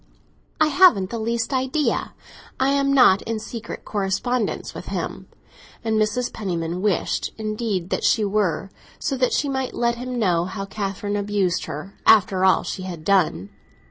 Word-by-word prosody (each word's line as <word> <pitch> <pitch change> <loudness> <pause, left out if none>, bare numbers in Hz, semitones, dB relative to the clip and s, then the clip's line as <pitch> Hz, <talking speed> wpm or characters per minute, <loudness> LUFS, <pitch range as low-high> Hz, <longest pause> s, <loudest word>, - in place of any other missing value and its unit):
"I 310 -1 +4
haven't 275 - +5
the 230 - -3
least 230 +3 -1
idea; 265 +3 0 0.4
I 265 +1 +3
am 275 0 +2
not 250 -8 +6
in 225 -1 -3
secret 230 +1 -7
correspondence 210 +4 -1
with - - -8
him!" - - -4 0.6
And 220 -1 +1
Mrs. 240 +4 -1
Penniman 175 -3 -3
wished 200 -3 0
indeed 215 -4 -3
that - - -1
she 220 -3 +3
were, 195 -3 0 0.3
so 275 - -2
that 255 -1 +2
she 290 - +1
might 265 -2 -2
let 235 0 +1
him 250 0 -4
know 175 -6 +2
how 195 +2 -5
Catherine 200 0 -3
abused 200 -3 0
her, 155 +6 -7
after 190 -3 +5
all 190 0 +4
she 190 - -5
had 175 -4 -7
done. 175 - +1
215 Hz, 160 wpm, -23 LUFS, 190-245 Hz, 0.6 s, not